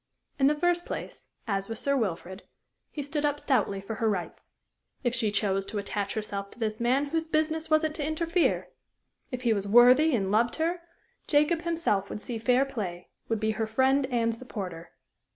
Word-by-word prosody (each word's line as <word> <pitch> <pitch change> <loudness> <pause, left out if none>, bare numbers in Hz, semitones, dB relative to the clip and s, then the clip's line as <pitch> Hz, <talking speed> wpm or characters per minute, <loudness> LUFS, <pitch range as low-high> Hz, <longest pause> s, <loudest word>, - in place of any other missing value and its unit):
In 270 - +5
the 300 - +3
first 350 +2 +1
place, - - -6 0.2
as 195 -1 -1
with 225 - -4
Sir 280 0 +1
Wilfrid, 190 -5 -3 0.5
he 290 - -5
stood 290 +1 -3
up 290 0 +1
stoutly 210 -9 +1
for 205 +3 -6
her 225 +1 +1
rights. 180 -5 -4 0.5
If 245 -2 +1
she 230 -3 +1
chose 200 -1 0
to 215 - -4
attach 200 0 -3
herself 200 -2 -4
to - - -17
this 215 -1 -2
man, 255 +4 +2
whose 325 +1 -1
business 315 0 0
was 310 0 +4
it 310 -1 0
to 305 - -4
interfere? 330 +3 0 0.6
If 250 -2 -5
he 235 -2 +3
was 200 -1 -2
worthy 250 +7 +6
and 195 -4 -1
loved 230 +3 +2
her, 340 +2 -1 0.5
Jacob 300 +3 +3
himself 330 - 0
would - - -5
see 230 +1 -5
fair 250 +4 +3
play, 190 -10 -5 0.2
would 225 -1 0
be 220 0 +1
her 220 0 -2
friend 265 +4 +2
and 230 -3 +1
supporter. 195 -8 -7
240 Hz, 190 wpm, -28 LUFS, 205-295 Hz, 0.6 s, worthy